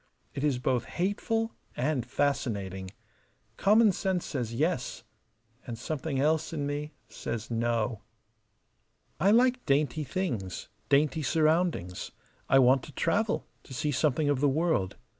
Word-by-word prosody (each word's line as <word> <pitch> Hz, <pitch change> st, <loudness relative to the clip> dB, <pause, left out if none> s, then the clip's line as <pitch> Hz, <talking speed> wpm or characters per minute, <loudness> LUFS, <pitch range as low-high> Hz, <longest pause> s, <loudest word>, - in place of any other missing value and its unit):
It 140 Hz, -, -4 dB
is 145 Hz, -4 st, +2 dB
both 125 Hz, -1 st, 0 dB
hateful 225 Hz, +5 st, -1 dB, 0.2 s
and 130 Hz, 0 st, 0 dB
fascinating. 100 Hz, -10 st, -1 dB, 0.7 s
Common 210 Hz, -, +5 dB
sense 185 Hz, -1 st, -1 dB
says 125 Hz, -6 st, -3 dB
Yes; 150 Hz, +2 st, -1 dB, 0.6 s
and 120 Hz, -2 st, -5 dB
something 140 Hz, +2 st, -3 dB
else 155 Hz, +2 st, +1 dB
in 150 Hz, -3 st, -2 dB
me 145 Hz, +1 st, -3 dB
says 115 Hz, 0 st, -5 dB
No. 115 Hz, -1 st, 0 dB, 1.2 s
I 190 Hz, -, +4 dB
like 250 Hz, +3 st, +4 dB
dainty 145 Hz, +2 st, +2 dB
things, 125 Hz, -, -3 dB, 0.2 s
dainty 150 Hz, +2 st, +3 dB
surroundings. 155 Hz, -, +1 dB, 0.4 s
I 135 Hz, -, +6 dB
want 130 Hz, 0 st, +5 dB
to -, -, -11 dB
travel, 200 Hz, -, 0 dB, 0.2 s
to 130 Hz, -, -10 dB
see 145 Hz, +4 st, 0 dB
something 145 Hz, +1 st, +1 dB
of 145 Hz, -2 st, +2 dB
the 145 Hz, +1 st, +3 dB
world. 155 Hz, -, +1 dB
145 Hz, 130 wpm, -29 LUFS, 125-165 Hz, 1.2 s, I